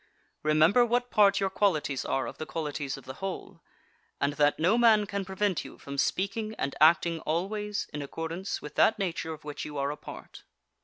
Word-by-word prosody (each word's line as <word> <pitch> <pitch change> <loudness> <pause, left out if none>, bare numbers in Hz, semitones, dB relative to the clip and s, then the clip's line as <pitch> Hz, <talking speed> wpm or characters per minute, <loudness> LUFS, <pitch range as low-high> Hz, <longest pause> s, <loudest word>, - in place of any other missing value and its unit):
Remember 155 +10 +4
what 245 +1 0
part 200 -1 +5
your 195 -1 0
qualities 160 -9 +1
are 135 - 0
of - - -8
the 155 - -5
qualities 145 -4 -3
of 135 - -13
the 130 - -7
whole, 195 -1 -6 0.6
and 140 +1 +1
that 145 0 +3
no 175 +7 +3
man 225 -3 +5
can 200 0 -3
prevent 190 -1 -1
you - - -11
from 140 0 -6
speaking 215 +8 -1
and 140 - -2
acting 165 +1 +5
always 205 +6 -2
in 145 - -4
accordance 165 +6 -4
with 150 - -8
that 220 - +4
nature 165 -4 -2
of 155 -1 -8
which 150 -1 -6
you 150 -1 -6
are 140 +1 0
a 150 - -6
part. - - -11
170 Hz, 195 wpm, -28 LUFS, 150-205 Hz, 0.6 s, part